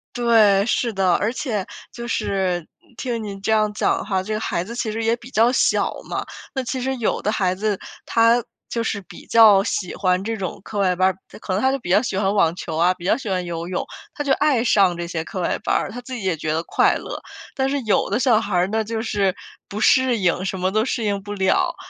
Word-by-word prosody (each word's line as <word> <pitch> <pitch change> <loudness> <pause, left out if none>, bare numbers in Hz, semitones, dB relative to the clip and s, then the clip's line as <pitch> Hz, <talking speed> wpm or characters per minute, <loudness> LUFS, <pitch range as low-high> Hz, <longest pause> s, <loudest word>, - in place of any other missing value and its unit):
对， 220 -5 +4
是 235 0 0
的。 190 -2 +2
而 215 +3 0
且 220 -8 -2 0.3
就 235 0 -7
是 190 -6 -1 0.3
听 240 -3 -3
您 200 -2 -6
这 210 - -1
样 215 -1 +3
讲 210 - 0
哈， 190 -3 -1
这 215 +3 -4
个 215 - -1
孩 170 -5 -2
子 220 +6 -8
其 235 -2 -2
实 225 +1 -3
也 225 +1 +2
比 240 +1 -13
较 235 -2 +3
小 255 - +2 0.2
嘛， - - -3 0.3
那 265 - -2
其 260 +1 -3
实 265 +1 -1
有 235 -4 -1
的 - - -1
孩 185 -4 +1
子 205 +1 -1 0.3
他 230 +1 +4 0.3
就 230 - -2
是 215 -2 -2
比 185 - -13
较 215 -4 +7
喜 210 -5 -2
欢 185 -1 +1
这 225 +2 -3
种 185 -4 -5
课 210 - -5
外 185 -2 +2
班 185 +1 +3
儿， 185 - -5
他 - - -13
可 205 - -6
能 190 +2 +1
他 265 - +3
就 270 - 0
比 205 - -8
较 190 +4 +5
喜 240 - -3
欢 195 0 +1
网 170 -5 +3
球 160 -3 -5
啊， 175 +3 +4
比 180 -1 -15
较 180 - +2
喜 250 -6 -6
欢 185 -1 0
游 170 -1 -5
泳， 180 0 -2 0.3
他 290 - -4
就 280 - 0
爱 280 -5 +2
上 195 -7 +4
这 170 0 -4
些 170 -1 -3
课 185 - -5
外 - - -1
班 - - +2
儿， - - -1
他 245 - -6
自 245 +1 -9
己 230 - -6
也 185 -4 0
觉 155 0 -2
得 160 +1 -1
快 - - +2
乐。 - - -6 0.3
但 265 0 0
是 285 - 0
有 215 -3 +1
的 - - +1
小 250 -4 +4
孩 205 -4 -3
儿 180 +1 +3
呢， 220 +2 -1
就 225 +1 -3
是 200 -5 0 0.3
不 210 +2 -5
适 260 -2 +4
应， 185 -1 0
什 190 - -2
么 185 +1 0
都 215 +2 +1
适 245 -3 -2
应 200 -2 -1
不 205 +1 -6
了， 190 -2 +1
210 Hz, 275 characters per minute, -22 LUFS, 185-230 Hz, 0.3 s, 较